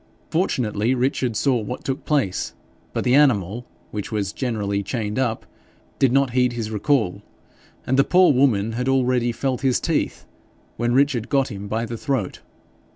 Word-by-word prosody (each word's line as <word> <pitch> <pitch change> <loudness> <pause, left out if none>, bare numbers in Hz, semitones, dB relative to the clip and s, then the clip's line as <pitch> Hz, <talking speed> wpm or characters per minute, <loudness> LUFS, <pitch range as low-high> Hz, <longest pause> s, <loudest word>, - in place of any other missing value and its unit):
Fortunately 125 - 0
Richard 125 -2 0
saw 130 +3 +2
what 115 +4 -6
took 135 0 -3
place, 135 -12 0 0.4
but - - -2
the 125 - +2
animal, 120 -5 +3 0.2
which 105 -1 -5
was 105 -3 -2
generally 105 -6 -2
chained 105 +1 -3
up, 115 -4 -1 0.5
did 135 -3 +4
not 135 -1 +2
heed 125 0 +2
his 115 -2 -4
recall, 105 -4 0 0.6
and 130 +2 +1
the - - +7
poor 180 -1 +5
woman 115 -5 +2
had 125 +3 -2
already 125 -2 +2
felt 130 +2 -2
his 130 -2 +2
teeth, - - -1 0.5
when 120 +1 0
Richard 135 -4 +2
got 135 -2 +1
him 100 0 -6
by 110 +3 -1
the 115 0 -5
throat. 130 -7 -2
125 Hz, 160 wpm, -22 LUFS, 110-135 Hz, 0.6 s, the